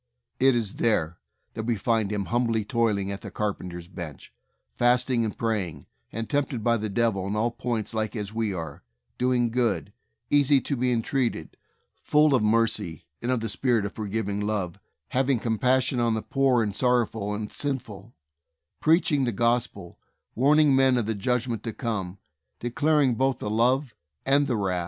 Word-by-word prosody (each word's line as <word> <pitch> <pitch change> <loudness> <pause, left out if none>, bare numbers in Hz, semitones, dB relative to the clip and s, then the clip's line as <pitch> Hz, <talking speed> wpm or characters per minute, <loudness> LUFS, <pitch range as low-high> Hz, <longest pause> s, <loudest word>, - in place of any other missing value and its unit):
It 130 -1 +5
is 110 -4 -2
there 90 -8 +1 0.3
that 110 0 -5
we 120 - +2
find 110 0 0
Him 100 -2 -2
humbly 115 -2 0
toil 115 -2 +1
ing 100 0 -3
at 100 - -5
the - - -7
carpenter's 90 -5 -4
bench, 85 -6 -9 0.4
fasting 125 0 +3
and 110 - -3
praying, 95 -10 -2 0.3
and 115 +1 -4
tempted 140 -5 -1
by 115 0 +3
the 110 0 -3
devil 100 -2 0
in 100 - -2
all 115 +3 +1
points 115 -2 -3
like 110 +1 -2
as 105 -1 -4
we 110 -2 -1
are, 85 -4 -6 0.4
doing 125 -2 +2
good, 115 - 0 0.4
easy 145 -1 +5
to 140 - -2
be 125 0 0
en 115 -2 +1
treated, 120 - -2 0.5
full 150 0 +4
of 130 - +3
mercy 105 -6 +1 0.2
and 120 - -1
of 125 -3 0
the 115 - -2
spirit 110 +2 +1
of 100 - -5
for 110 -2 -5
giving 100 -1 -2
love, 105 -5 -2 0.3
having 135 0 +2
compassion 125 +3 +1
on 115 -1 +2
the 110 - -3
poor 135 -4 +2
and 105 -2 -3
sorrowful 115 -5 +1
and 105 0 -5
sinful, 125 -6 -4 0.6
preaching 155 -3 +3
the 120 - 0
Gospel, 115 -5 -1 0.3
warning 145 +3 +4
men 130 -1 +4
of 120 - 0
the 110 - -1
judgment 120 +1 -1
to 115 -1 -5
come, 100 -7 -3 0.4
declaring 140 +2 +2
both 130 +1 +1
the 105 - -4
love 125 +3 +2 0.3
and 140 +1 +3
the 120 - 0
wrath. 95 -3 0
115 Hz, 175 wpm, -26 LUFS, 105-125 Hz, 0.6 s, It